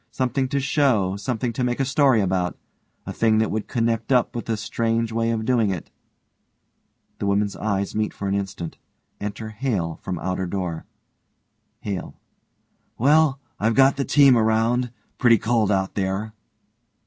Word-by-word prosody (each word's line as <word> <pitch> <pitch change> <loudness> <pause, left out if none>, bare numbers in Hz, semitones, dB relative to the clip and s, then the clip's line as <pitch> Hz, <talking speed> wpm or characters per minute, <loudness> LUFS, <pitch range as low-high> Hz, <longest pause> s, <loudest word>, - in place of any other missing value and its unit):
Something 130 +1 -1
to 140 +2 -1
show 130 -9 +2
something 115 +3 -2
to 125 - -2
make 120 +1 -1
a 135 - +2
story 135 -4 +3
about 90 -2 -1 0.5
a - - -5
thing 110 -1 +2
that 110 -1 +1
would 110 0 -3
connect 115 0 -1
up 125 -2 +2
with 120 - -4
this 110 -2 -1
strange 115 +1 -1
way 115 0 0
of 110 -1 -1
doing 115 -4 +2
it 90 -4 -5 1.3
(The 100 - -2
women's 100 0 +1
eyes 100 -2 -2
meet 105 0 -1
for 100 - -5
an 95 - 0
instant. 95 -4 -4 0.4
Enter 105 +2 -5
HALE 105 -8 -2
from 90 -2 -4
outer 95 +2 -2
door.) 85 -3 -4 0.9
HALE: 100 -4 -5 0.8
Well, 145 +2 +4 0.2
I've 110 +1 +1
got 135 0 +5
the 140 - -1
team 140 -2 +5
around. 115 +2 +2 0.3
Pretty 120 -3 +5
cold 110 -1 +1
out 95 -1 0
there. 100 +2 -2
110 Hz, 160 wpm, -23 LUFS, 100-125 Hz, 1.3 s, got